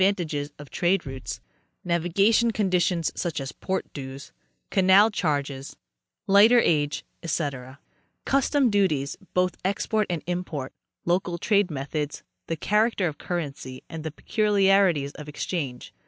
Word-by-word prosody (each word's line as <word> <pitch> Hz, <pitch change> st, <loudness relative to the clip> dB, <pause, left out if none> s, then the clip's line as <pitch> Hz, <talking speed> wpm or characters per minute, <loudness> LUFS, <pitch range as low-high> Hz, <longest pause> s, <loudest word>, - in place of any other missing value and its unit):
tages 150 Hz, -5 st, -3 dB
of 145 Hz, -1 st, -12 dB
trade 175 Hz, +1 st, +1 dB
routes; 135 Hz, -1 st, -6 dB, 0.5 s
navigation 190 Hz, +7 st, +3 dB
conditions, 180 Hz, -5 st, +1 dB
such 170 Hz, -4 st, -3 dB
as 135 Hz, -1 st, -5 dB
port 190 Hz, +9 st, -3 dB
dues, 135 Hz, -1 st, -8 dB, 0.4 s
canal 195 Hz, +3 st, +6 dB
charges, 145 Hz, -8 st, -2 dB, 0.5 s
lighterage, 195 Hz, -8 st, +4 dB, 0.2 s
ete; 140 Hz, -5 st, -3 dB, 0.5 s
custom 275 Hz, -2 st, +2 dB
duties, 155 Hz, -9 st, +1 dB, 0.2 s
both 180 Hz, -1 st, +1 dB
export 210 Hz, +2 st, 0 dB
and 170 Hz, -3 st, -2 dB
import; 175 Hz, -6 st, -4 dB, 0.3 s
local 175 Hz, 0 st, 0 dB
trade 200 Hz, +1 st, +2 dB
methods; 150 Hz, +1 st, -4 dB, 0.2 s
the 165 Hz, -, -1 dB
character 210 Hz, +2 st, +2 dB
of 150 Hz, -2 st, -6 dB
currency 145 Hz, -6 st, -5 dB
and 160 Hz, -1 st, -6 dB
the 160 Hz, -, -3 dB
peculiarities 195 Hz, -5 st, +2 dB
of 150 Hz, 0 st, -10 dB
exchange. 145 Hz, -4 st, -4 dB
170 Hz, 120 wpm, -25 LUFS, 145-195 Hz, 0.5 s, canal